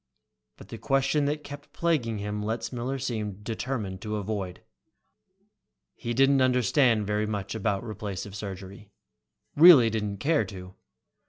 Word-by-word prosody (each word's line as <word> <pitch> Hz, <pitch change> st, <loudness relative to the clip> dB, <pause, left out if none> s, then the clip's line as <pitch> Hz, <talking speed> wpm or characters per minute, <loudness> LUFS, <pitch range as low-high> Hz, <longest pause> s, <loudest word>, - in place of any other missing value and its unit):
But -, -, -14 dB
the -, -, -8 dB
question 135 Hz, +2 st, +1 dB
that 150 Hz, +1 st, -2 dB
kept 145 Hz, 0 st, -10 dB
plaguing 140 Hz, -10 st, 0 dB
him 105 Hz, +1 st, -4 dB
Letzmiller 120 Hz, +4 st, -3 dB
seemed 105 Hz, -6 st, -4 dB
determined 110 Hz, -4 st, -4 dB
to 110 Hz, -1 st, -4 dB
avoid. 100 Hz, -3 st, -4 dB, 1.3 s
He 120 Hz, 0 st, -5 dB
didn't 135 Hz, +1 st, +4 dB
understand 125 Hz, -2 st, +3 dB
very 105 Hz, +1 st, -1 dB
much 100 Hz, -2 st, -4 dB
about 105 Hz, -2 st, -1 dB
replacive 100 Hz, -3 st, -6 dB
surgery, 100 Hz, 0 st, -8 dB, 0.7 s
really 145 Hz, -8 st, +8 dB
didn't 105 Hz, -2 st, -2 dB
care 155 Hz, +8 st, +2 dB
to. 90 Hz, -2 st, -10 dB
110 Hz, 130 wpm, -27 LUFS, 100-135 Hz, 1.3 s, really